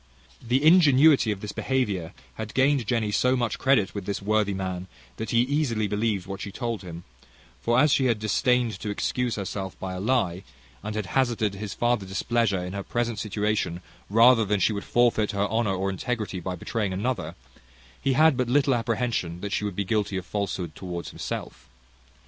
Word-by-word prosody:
The 125 +4 0
ingenuity 155 -7 +6
of 100 -2 -4
this 105 - -5
behaviour 105 -11 -1 0.2
had 110 -1 -7
gained 135 -3 +3
Jenny 115 -4 0
so 125 +4 +2
much 120 -4 -1
credit 130 -8 +2
with 100 -3 -6
this 100 - -2
worthy 105 -1 +1
man, 95 -1 -4 0.3
that 110 - -4
he 115 - +3
easily 125 -5 0
believed 105 -2 -1
what 95 0 -6
she 100 - -5
told 115 0 -3
him; 85 -2 -8 0.6
for 120 0 +2
as 150 +1 +4
she 135 - +2
had 120 -3 +2
disdained 115 +1 +1
to 105 - -4
excuse 120 +4 -1
herself 95 -1 -5
by 95 -1 -4
a 90 - -5
lie, 95 -5 0 0.4
and 105 0 -5
had 110 -2 -2
hazarded 115 -3 0
his 100 +1 -6
further 120 -5 0
displeasure 100 -1 0
in 90 - -6
her 100 - -3
present 120 +1 -2
situation, 105 -4 -1 0.3
rather 115 +2 +6
than 105 -1 0
she 105 - +2
would 100 -1 -5
forfeit 115 -3 +2
her 100 0 +1
honour 110 -3 +1
or 95 +1 -1
integrity 105 -1 -3
by 90 +1 -4
betraying 105 +2 -2
another, 120 +7 -2 0.7
he 135 - +1
had 155 +2 +5
but 125 -1 -1
little 140 +1 +3
apprehensions 115 -7 -1
that 100 - -3
she - - 0
would 100 -3 -3
be 100 - -1
guilty 105 -1 0
of 90 - -5
falsehood 95 -5 -3
towards 90 -1 -6
himself. 65 -1 -6
110 Hz, 190 wpm, -26 LUFS, 95-120 Hz, 0.7 s, ingenuity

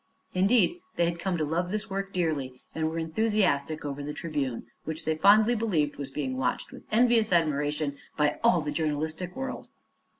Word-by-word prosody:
Indeed, 225 - +3 0.2
they 170 - +3
had 170 0 -2
come 185 -1 -1
to 155 - 0
love 170 +4 -1
this 215 +2 -2
work 195 -1 -3
dearly 145 -8 -2
and 160 0 0
were 165 - -4
enthusiastic 160 -4 +1
over 145 0 -4
the 150 +1 -5
Tribune, 145 -7 -3 0.2
which 160 +1 -5
they 160 - +2
fondly 210 +7 +6
believed 185 -11 0
was 140 -2 -5
being 135 -2 -3
watched 130 -1 -1
with - - -12
envious 230 -1 +4
admiration 150 -3 +1 0.2
by 150 -1 +2
all 230 -8 +5
the 150 -1 -3
journalistic 160 +3 -2
world. 265 0 -5
160 Hz, 175 wpm, -28 LUFS, 150-195 Hz, 0.2 s, fondly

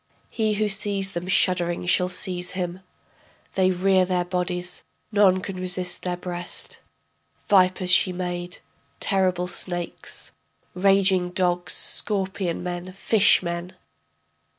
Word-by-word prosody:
He 215 -2 0
who 215 +1 +1
sees 200 -1 0
them 175 -1 -5
shuddering 175 -2 +2
shall 180 +1 +2
seize 180 -1 -3
him, 180 -1 -3 0.7
They 185 -1 +3
rear 185 +1 +3
their 180 -1 0
bodies, 180 -1 -3 0.3
none 195 -3 +4
can 190 0 -6
resist 180 0 -1
their 180 -1 -3
breast. 175 0 -5 0.7
Vipers 185 -2 +4
she 185 +1 +5
made, 175 0 -4 0.4
terrible 185 -2 +1
snakes....... 175 -1 -3 0.4
raging 190 -1 +4
dogs, 180 -1 0
scorpion 190 -4 -2
men... 180 +1 -5
fish 200 0 +4
men.... 170 +1 -4
185 Hz, 115 wpm, -24 LUFS, 180-190 Hz, 0.7 s, she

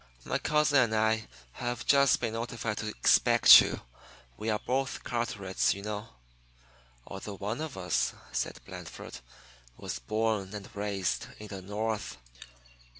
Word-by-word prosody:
"My - - -1
cousin 150 -2 +3
and 115 -3 +2
I 110 0 +1 0.2
have 120 - -4
just 140 -1 +5
been 115 -2 -2
notified 115 -2 -3
to 110 - -4
expect 85 - +7
you. - - -3 0.5
We 110 +1 -4
are 105 - +2
both 135 +2 -1
Carterets, 105 -7 -1
you 100 - -8
know." 105 +1 -4 1.0
"Although 100 +1 -7
one 105 +8 -3
of 155 -9 -5
us," 90 -2 0 0.2
said - - -2
Blandford, 65 - -9 0.6
"was - - -5
born 105 - -1
and 100 -1 -9
raised 100 -3 -2
in 105 0 -10
the 95 -2 -7
North." 105 +3 -3
110 Hz, 140 wpm, -30 LUFS, 100-120 Hz, 1.0 s, expect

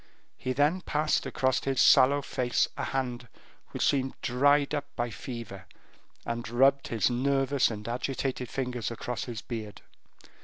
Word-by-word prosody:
He 130 - -4
then 150 +7 +2
passed 155 -2 0
across 130 0 0
his 135 -1 -1
sallow 140 +2 +6
face 125 -2 0
a - - -3
hand 125 -2 -3 0.4
which - - -1
seemed 135 -2 +1
dried 145 +4 +3
up 145 -1 -1
by 120 -1 -2
fever, 105 -6 -8 0.6
and 115 -1 -4
rubbed 135 +3 +3
his 115 +1 +1
nervous 135 +2 +2
and 105 -1 -6
agitated 130 0 -3
fingers 125 -3 -3
across 120 0 -4
his 115 -4 -6
beard. 110 -4 -7
130 Hz, 145 wpm, -28 LUFS, 120-140 Hz, 0.6 s, sallow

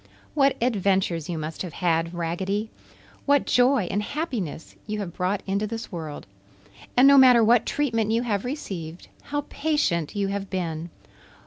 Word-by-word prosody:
What 275 -2 +3
adventures 190 -8 +1
you 170 - -2
must 155 +1 -5
have 180 -4 -5
had, 165 -2 0
Raggedy! 190 +6 -2 0.6
What 285 0 +4
joy 250 -1 +3
and 205 +2 0
happiness 225 - -4
you 215 0 -3
have 195 -5 -5
brought 190 +2 -1
into 200 +2 -1
this 225 +2 -6
world! 160 -5 -6 0.7
And 255 +2 +7
no 280 0 +8
matter 250 -3 +7
what 230 +1 +4
treatment 230 -7 0
you 230 +2 +1
have 205 -5 -1
received, 185 - -6 0.2
how 290 0 -3
patient 280 - 0
you 200 -1 0
have 200 0 -4
been! 170 -3 -3
200 Hz, 155 wpm, -25 LUFS, 175-245 Hz, 0.7 s, no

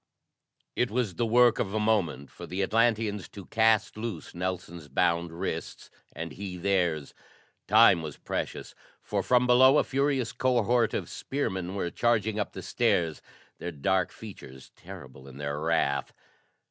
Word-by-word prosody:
It 125 - +1
was 115 -3 -1
the 120 +4 -1
work 120 +1 +5
of 100 +2 -2
a - - +1
moment 95 -11 0
for - - -10
the 95 +2 -2
Atlanteans 110 -2 +1
to 100 -3 -10
cast 110 -1 +2
loose 110 -8 -6
Nelson's 85 -3 -5
bound 85 0 +1
wrists, 85 +4 -5 0.2
and 80 0 -5
he 95 0 -6
theirs; 90 -6 0 0.5
time 105 -4 +6
was 75 -3 -7
precious, - - -5 0.3
for, - - -1
from 125 0 +3
below, 130 +3 +6
a - - +4
furious 135 -3 0
cohort 120 -2 +1
of - - -3
spearmen 95 -9 -3
were 85 -3 -2
charging 110 -2 +1
up 105 - -3
the - - -7
stairs, 80 -2 0 0.4
their 90 - -4
dark 95 +5 0
features 65 -12 -11
terrible 70 -8 -12
in 65 0 -12
their 70 0 -3
wrath. 75 -4 0
95 Hz, 150 wpm, -28 LUFS, 85-115 Hz, 0.5 s, time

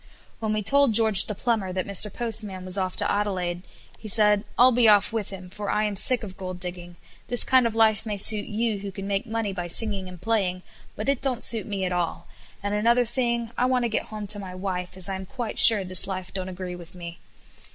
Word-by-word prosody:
When 220 -1 -3
we 215 0 -2
told 275 0 +4
George 220 -3 +6
the 210 - -5
Plumber 215 -4 -2
that 185 0 -3
Mr. 200 +1 +3
Postman 210 -5 -3
was 185 0 -2
off 185 -2 -2
to - - -2
Adelaide, 185 -4 -2 0.4
he 215 - -10
said 210 -1 +2
"I'll 250 +1 +6
be 240 -1 +3
off 205 +1 +3
with 220 -3 -3
him, 185 -2 -9
for 205 +1 -6
I 215 - 0
am 210 -1 -2
sick 240 +4 +5
of 190 -3 -9
gold 185 -1 -7
digging; 175 -1 -8 0.3
this 245 - +4
kind 260 -2 +3
of 225 - -6
life 220 -2 +3
may 210 -1 -3
suit 210 +1 +3
you 220 -1 -2
who 200 0 -7
can 195 0 -8
make 200 +3 -2
money 225 -3 -3
by 175 -2 -5
singing 195 0 +2
and 180 -1 -12
playing, 190 -5 -2 0.3
but 215 - -6
it 275 -2 0
don't 260 -3 -2
suit 225 -4 +4
me 195 -3 -3
at 180 - -3
all, 175 -2 -3 0.4
and 205 0 -3
another 235 +4 +2
thing, 235 -1 -2
I 250 - +2
want 255 -1 0
to 235 - -1
get 220 - -2
home 215 -1 -7
to 205 +1 +1
my 185 -2 -9
wife, 185 -1 -5
as 185 - +1
I 195 - -4
am 190 0 -7
quite 245 -5 -5
sure 220 -5 +8
this 185 0 -1
life 185 -2 -6
don't 185 -1 -5
agree 180 -1 -7
with 175 0 -13
me." 170 -1 -10
205 Hz, 240 wpm, -24 LUFS, 185-225 Hz, 0.4 s, sure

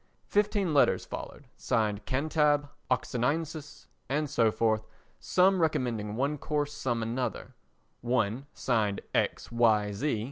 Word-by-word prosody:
Fifteen 205 -4 +1
letters 145 - +3
followed, 145 - -8
signed 105 -4 -1
"Cantab," 145 +1 +2 0.2
"Oxoniensis," 145 +5 -2 0.2
and 150 +2 0
so 115 -4 +3
forth, 110 -1 +1 0.4
some 185 +7 +3
recommending 115 -9 0
one 140 +4 -1
course, 145 0 -1
some 120 -6 -1
another. 120 +3 -3 0.5
One, 120 +1 0
signed 110 -5 0
"_X.Y. 115 -3 +2
130 Hz, 105 wpm, -29 LUFS, 115-150 Hz, 0.5 s, letters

